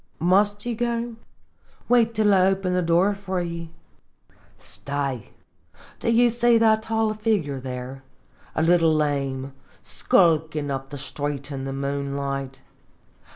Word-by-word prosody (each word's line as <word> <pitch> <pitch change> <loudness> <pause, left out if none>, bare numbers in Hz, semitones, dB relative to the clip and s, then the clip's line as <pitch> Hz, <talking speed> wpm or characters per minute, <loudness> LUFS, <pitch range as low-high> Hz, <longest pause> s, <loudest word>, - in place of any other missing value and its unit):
" - - -38 0.2
Must 205 +1 +1
ye 240 - -1
go? 235 0 -2 0.7
Wait 230 -2 +3
till 210 -1 +3
I 185 -1 +5
open 190 -1 0
the 180 - +2
door 175 +4 +3
for 195 -2 -4
ye. 170 -1 -5 0.9
Stay, 140 -4 -4 0.7
do - - -1
ye 235 +1 +5
see 240 0 +4
that 220 -1 +4
tall 220 -1 0
figure, 135 - -3 0.5
a 160 - +1
little 165 -1 +4
lame, 140 -3 -1 0.3
skulkin' 155 -4 +2
up 135 0 -4
the 145 - -7
street 145 +1 -4
in 135 -1 -4
the 135 - -4
moonlight? 140 -1 -3
165 Hz, 130 wpm, -24 LUFS, 140-215 Hz, 0.9 s, I